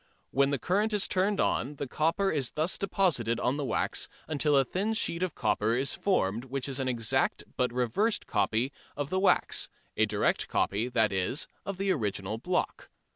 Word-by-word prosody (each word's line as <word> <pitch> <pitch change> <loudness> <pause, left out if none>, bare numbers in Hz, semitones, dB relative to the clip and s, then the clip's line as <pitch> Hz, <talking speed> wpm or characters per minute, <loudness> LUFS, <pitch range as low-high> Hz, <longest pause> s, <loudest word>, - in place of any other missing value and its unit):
When 140 +1 +3
the 140 - 0
current 205 - 0
is 205 -2 +3
turned 195 +2 +1
on 140 +5 0
the 140 - -4
copper 165 +8 +1
is 135 -5 -1
thus 155 +4 0
deposited 150 - +1
on 125 +4 0
the 145 - -2
wax 135 - 0 0.2
until 150 -1 +2
a 135 - +4
thin 200 - -1
sheet 170 -6 0
of 185 -3 -1
copper 110 +2 +1
is 135 +2 0
formed 115 - 0
which 135 0 -3
is 135 -1 -3
an 130 - -1
exact 115 -3 +1
but 125 -1 +1
reversed 125 - 0
copy 110 +6 0 0.3
of 145 -1 -3
the 185 - +1
wax, 195 - +3 0.3
a - - +3
direct - - 0
copy, 105 +5 0
that 110 -4 +2
is, 95 - -1 0.2
of 195 -2 -3
the 195 0 +1
original 105 - -2
block. 180 - -2
140 Hz, 185 wpm, -29 LUFS, 120-185 Hz, 0.3 s, a